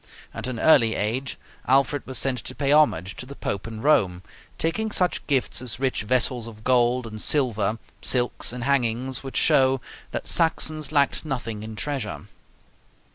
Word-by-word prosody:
At - - -4
an 125 -3 -4
early 115 -7 +5
age 125 +6 -2 0.3
Alfred 135 +2 +2
was 130 -1 -1
sent 130 -2 +1
to 130 - -7
pay 140 -1 0
homage 100 - +3
to 125 - -7
the 140 - -9
Pope 100 -4 -4
in 110 -1 -7
Rome, 95 -12 +2 0.3
taking 220 +7 -1
such 180 -4 0
gifts 135 -4 0
as 125 -2 -3
rich 130 -4 0
vessels 120 +1 0
of 110 -1 -12
gold 125 0 +2
and 110 -1 -7
silver, 115 -7 +1 0.2
silks, 125 -2 +1
and 125 0 -5
hangings, 130 -1 +1
which 135 -1 -6
show 135 -3 +4 0.3
that - - -5
Saxons 155 -2 +1
lacked 140 -2 +2
nothing 120 -8 -4
in 110 0 -7
treasure. 120 -6 -4
130 Hz, 165 wpm, -24 LUFS, 115-140 Hz, 0.3 s, early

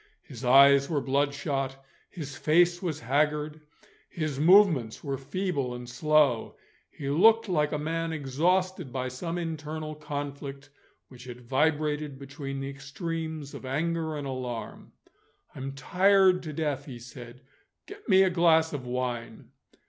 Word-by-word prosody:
His 125 -1 -11
eyes 140 +2 +6
were 155 -4 +1
bloodshot, 135 -1 -1 0.2
his 145 -6 -7
face 175 +3 +3
was 165 -5 -3
haggard, 150 +4 0 0.5
his 155 -5 -3
movements 160 - +4
were 140 -2 -2
feeble 140 -3 -2
and 125 0 -8
slow. 145 -1 +2 0.3
He 140 -1 -5
looked 220 +9 +5
like 150 -5 +1
a 150 - -1
man 165 +2 -2
exhausted 165 +3 0
by 130 0 -3
some 165 +7 -5
internal 155 -2 -5
conflict, 145 -2 -6 0.4
which 125 -1 -13
had 125 -1 -9
vibrated 150 +2 0
between 135 0 -7
the 135 - -4
extremes 155 +1 -5
of - - -9
anger 160 +3 -2
and 145 - -5
alarm. 125 -3 -6 0.6
"I'm 135 +1 -6
tired 185 +6 +3
to 155 - -6
death," 145 -3 -2
he 130 -4 -8
said; 120 +1 -11 0.4
"get 405 - -12
me 190 -1 +7
a 190 - +2
glass 165 -2 +3
of 130 -4 -5
wine." 120 -2 -4
145 Hz, 140 wpm, -28 LUFS, 135-165 Hz, 0.6 s, me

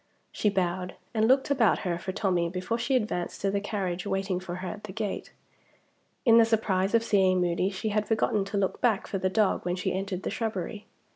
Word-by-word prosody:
She 210 - +1
bowed, 180 -2 -1 0.2
and 220 -1 +2
looked 265 +2 +3
about 240 -7 +3
her 175 -1 -1
for 190 - -4
Tommie 180 -3 0
before 185 +6 -2
she 260 +3 +1
advanced 210 -7 -1
to 195 - +1
the 200 0 0
carriage 190 -3 -3
waiting 195 -2 -1
for 180 -1 -6
her 185 +1 -5
at 210 +2 -6
the 205 - -7
gate. 210 0 -4 0.9
In 230 -1 +7
the - - +8
surprise 205 -3 +1
of 230 - +3
seeing 190 -4 +3
Moody 180 +1 +1
she 200 +2 -3
had 210 0 0
forgotten 215 -2 +1
to 200 +1 -3
look 195 -1 -1
back 225 -6 +2
for 195 - -3
the 185 - +1
dog 210 0 +1
when 175 0 -1
she 185 0 -2
entered 190 0 -3
the - - -2
shrubbery. 215 -2 -4
195 Hz, 215 wpm, -28 LUFS, 185-215 Hz, 0.9 s, the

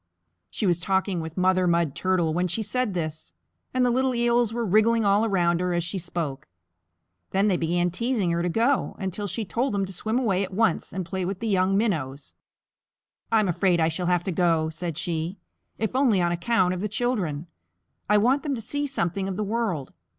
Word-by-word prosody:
She - - -2
was 175 -2 +2
talking 190 0 0
with 160 +1 -7
Mother 185 0 +3
Mud 170 -4 +2
Turtle 180 -4 +1
when 180 +2 +1
she 200 +6 -2
said 215 -1 -1
this, 155 -2 -5 0.4
and 255 -1 +2
the 245 - +3
little 260 +1 +1
Eels 235 -1 +2
were 235 0 -2
wriggling 220 +3 +3
all 200 +2 +4
around 175 -5 +2
her 180 -1 0
as 175 - 0
she 185 +3 -3
spoke. 165 -6 -4 0.8
Then 195 +2 +2
they 190 - +2
began 175 +1 0
teasing 220 -2 0
her 170 0 0
to 175 - 0
go, 235 +9 +1
until 195 +2 -3
she 205 +4 -3
told 240 +4 -1
them 195 -1 +1
to 190 - -8
swim 220 +6 -2
away 200 -7 +1
at 190 -1 -6
once 220 -5 +1
and 185 0 -4
play 190 +1 -3
with 185 +1 -2
the 230 - -3
young 195 -1 +2
Minnows. 150 - -2 1.0
"I'm 215 -3 +3
afraid 180 0 +2
I 160 0 +3
shall 175 +2 -3
have 175 -1 +2
to 190 - -2
go," 165 -2 +1
said 165 -1 -5
she, 170 +2 -3 0.4
"if 220 +2 -2
only 255 -7 +3
on 175 -1 +2
account 180 +1 +1
of 180 - -4
the 210 - -2
children. 195 - -1 0.6
I 210 - +5
want 250 +7 +3
them 290 -3 -2
to - - -5
see 285 +6 -2
something 190 -7 -1
of 190 -1 -4
the 215 - -1
world. 205 - -2
190 Hz, 210 wpm, -25 LUFS, 175-225 Hz, 1.0 s, I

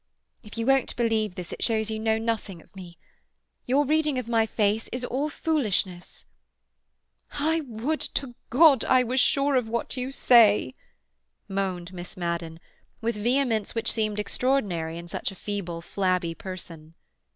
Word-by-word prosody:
If 210 -1 -11
you 230 - -1
won't 270 0 +2
believe 220 -4 0
this 180 -1 -6
it - - -8
shows 220 -1 +1
you 220 - -3
know 220 0 +1
nothing 225 -5 -3
of 160 - -21
me. 175 -2 -10 0.7
Your 275 +4 +3
reading 305 -1 +1
of 250 -2 -3
my 225 -1 +2
face 215 0 0
is 250 0 -3
all 275 +5 -1
foolishness." 210 - -2 1.1
"I 315 +3 +1
would 245 +7 -2 0.2
to 270 -3 -2 0.2
God 275 0 +6
I 255 -1 +4
were 250 +1 -2
sure 275 +1 +3
of 245 -3 +1
what 235 +2 -2
you 255 +1 -3
say!" 220 - +5 0.7
moaned 190 -2 -3
Miss 175 0 -9
Madden, 170 -2 -3 0.4
with 230 0 -1
vehemence 235 0 0
which 230 0 0
seemed 215 -2 -1
extraordinary 205 -8 -1
in 170 0 -8
such - - -3
a - - -11
feeble, 180 -4 -5
flabby 185 -3 0
person. 165 -3 -9
220 Hz, 155 wpm, -26 LUFS, 185-255 Hz, 1.1 s, God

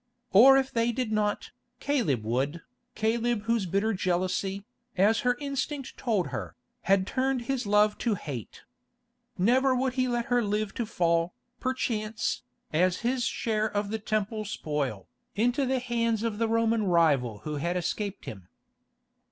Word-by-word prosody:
Or 260 +7 +8
if 270 0 0
they 230 0 +1
did 240 -2 -2
not, 210 -1 -1 0.3
Caleb 205 - 0
would, 135 +9 -1 0.3
Caleb 225 0 0
whose 225 -3 0
bitter 200 +5 +1
jealousy, 185 +2 -1 0.3
as 210 +4 +4
her 250 -2 +1
instinct 280 -1 -3
told 215 -8 0
her, - - -5 0.3
had 195 -1 +4
turned 260 +1 0
his 255 -2 -2
love 210 +1 +3
to 230 -4 +1
hate. 135 - -7 0.7
Never 255 +7 +3
would 255 0 0
he 255 -1 +1
let 240 -1 -1
her 245 -2 +2
live 210 -1 -1
to 235 - -3
fall, 170 -4 +1 0.2
perchance, 230 -4 -2 0.3
as 180 +3 +2
his 250 0 +1
share 215 -1 0
of 205 0 -2
the 220 - -2
Temple 215 +1 -2
spoil, 145 - -3 0.3
into 245 +6 +1
the 260 +1 +1
hands 230 -2 0
of 225 -2 -2
the 230 - +2
Roman 230 0 +2
rival 140 - +2
who 150 -1 -3
had 170 +5 -1
escaped 200 +3 -3
him. 95 -4 -8
215 Hz, 150 wpm, -28 LUFS, 185-240 Hz, 0.7 s, Or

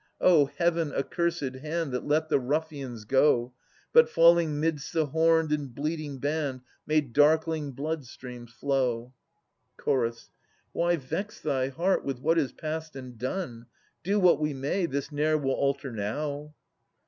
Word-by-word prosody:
O 155 -6 +5
heaven 170 0 0
accursed 165 -1 -1
hand 155 +2 -3
That 125 +2 -3
let 155 +2 +2
the - - +3
ruffians 135 -4 -3
go, 130 -1 +3 0.4
But 475 0 +7
falling 165 -2 +4
'midst 155 -2 -1
the 160 -2 +2
horn'd 160 +1 +2
and 145 -5 -2
bleating 150 -1 -3
band, 145 -1 -2 0.3
Made 150 -5 +1
darkling 155 0 +3
blood 150 +1 -4
streams 125 -1 -10
flow 125 -2 -1 0.7
1 120 -3 +2
Ch. - - -19 0.6
Why 175 0 +2
vex 165 +8 -5
thy 135 -4 0
heart 170 +8 0
with 135 -3 -3
what 165 +5 +2
is 140 -5 0
past 160 -1 -5
and 130 -2 -8
done? 125 -5 -4 0.4
Do 200 +3 +1
what 180 -5 +5
we 150 -2 -1
may, 145 +7 -1
this 140 0 -3
ne'er 155 +1 +2
will 135 -3 -1
alter 140 -1 -1
now. 145 +8 -4
150 Hz, 150 wpm, -28 LUFS, 130-160 Hz, 0.7 s, But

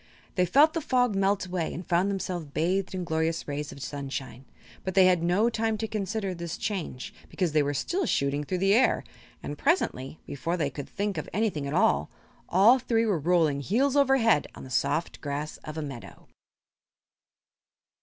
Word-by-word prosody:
They 180 -2 +2
felt 295 - +5
the 330 - -1
fog 250 -5 +2
melt 195 0 +1
away 180 -3 -2
and 175 - -6
found 180 +3 +2
themselves 185 -4 -3
bathed 180 +7 -1
in 185 - -3
glorious 160 0 -1
rays 145 0 -4
of 140 - -9
sunshine; 135 -2 -6 0.4
but 190 - -4
they 190 -1 +7
had 180 -2 +4
no 180 +6 +2
time 225 -1 0
to 220 +1 -3
consider 210 -2 -2
this 170 -1 -5
change 185 -11 -4 0.2
because 180 -4 -1
they 155 0 +3
were 145 0 -1
still 365 - -1
shooting 140 +1 0
through 185 +5 -2
the 195 +2 +3
air, 250 +4 +3 0.4
and 145 - -6
presently 160 - 0
before 165 +6 -3
they 145 -4 -1
could 140 +1 -7
think 205 0 -2
of - - -7
anything 195 -9 -1
at 140 - -3
all 70 +1 +3 0.4
all 215 +8 +6
three 230 -2 +1
were 200 -7 +1
rolling 160 -3 +2
heels 255 - +1
over 275 -1 +4
head 225 - +3
on - - -10
the 130 - -10
soft 165 +6 -1
grass 145 +1 -4
of 155 +1 -9
a 155 - -2
meadow. 135 -5 -9
180 Hz, 185 wpm, -27 LUFS, 150-210 Hz, 0.4 s, they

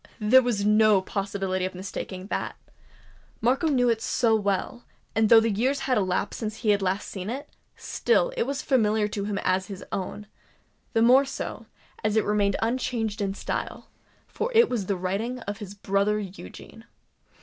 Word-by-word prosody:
there 225 +5 +6
was 230 -5 -1
no 210 -1 +5
possibility 195 -1 -2
of 185 0 -3
mistaking 185 0 -6
that! - - -3 0.8
Markham 270 +6 +2
knew 245 -1 +3
it 230 -2 +1
so 235 -1 +2
well; 205 +4 -1 0.3
and 220 -1 +2
though 230 - +9
years 230 +6 0
had 260 - +1
elapsed 190 -1 -1
since 215 -2 -3
he 220 - -1
had 205 -1 +2
last 190 +1 -1
seen 190 0 -6
it, 275 +5 -5 0.3
still - - +1
it 470 - 0
was 280 +1 -3
familiar 220 -5 +2
to 205 -1 -4
him 205 -1 -2
as 185 0 +1
his 195 -2 -8
own—the 210 +3 -6
more 255 +4 +6
so, - - -6 0.4
as 215 0 +1
it 220 - +2
remained 205 -1 +1
unchanged 225 -3 -1
in 195 -1 -1
style;—for 465 - -6
it 460 0 +6
was 215 -7 -2
the 200 - 0
writing 200 +7 -2
of 205 0 -5
his 205 -2 -8
brother 200 +1 +1
Eugene! 190 - -9
210 Hz, 165 wpm, -26 LUFS, 200-240 Hz, 0.8 s, though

